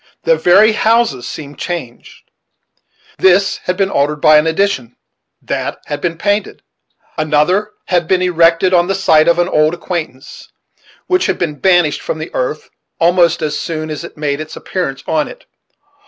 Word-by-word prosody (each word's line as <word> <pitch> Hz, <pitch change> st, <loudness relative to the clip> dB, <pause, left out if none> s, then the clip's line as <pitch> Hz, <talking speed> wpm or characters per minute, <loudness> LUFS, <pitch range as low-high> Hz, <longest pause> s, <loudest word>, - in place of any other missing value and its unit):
The -, -, +3 dB
very 210 Hz, -, +5 dB
houses 220 Hz, -, +1 dB
seemed 145 Hz, -3 st, -9 dB
changed. 160 Hz, -10 st, -7 dB, 1.0 s
This 190 Hz, +1 st, +3 dB
had 180 Hz, 0 st, -1 dB
been 195 Hz, -1 st, 0 dB
altered 145 Hz, +2 st, +1 dB
by 155 Hz, 0 st, +6 dB
an 155 Hz, -, -1 dB
addition; 160 Hz, -, -1 dB, 0.5 s
that -, -, -3 dB
had 145 Hz, 0 st, -5 dB
been 170 Hz, -2 st, -2 dB
painted; 205 Hz, +3 st, -2 dB, 0.6 s
another 155 Hz, +8 st, +1 dB
had 175 Hz, -3 st, 0 dB
been 185 Hz, 0 st, +1 dB
erected 170 Hz, +1 st, +3 dB
on 175 Hz, -1 st, +3 dB
the 195 Hz, -, 0 dB
site 160 Hz, -5 st, +3 dB
of 170 Hz, -, +3 dB
an 175 Hz, -, +1 dB
old 155 Hz, +2 st, +2 dB
acquaintance, 165 Hz, -7 st, -7 dB, 0.5 s
which 365 Hz, 0 st, +1 dB
had -, -, -1 dB
been 150 Hz, -4 st, -3 dB
banished 175 Hz, -5 st, +2 dB
from -, -, -4 dB
the 155 Hz, +1 st, -7 dB
earth 150 Hz, +4 st, -3 dB, 0.3 s
almost 170 Hz, -1 st, +3 dB
as 150 Hz, -1 st, -2 dB
soon 155 Hz, -1 st, -4 dB
as 155 Hz, +1 st, -5 dB
it 170 Hz, -, -11 dB
made 145 Hz, -1 st, -2 dB
its 155 Hz, 0 st, -8 dB
appearance 135 Hz, -8 st, -4 dB
on 155 Hz, -2 st, 0 dB
it. -, -, -13 dB
170 Hz, 165 wpm, -15 LUFS, 150-185 Hz, 1.0 s, by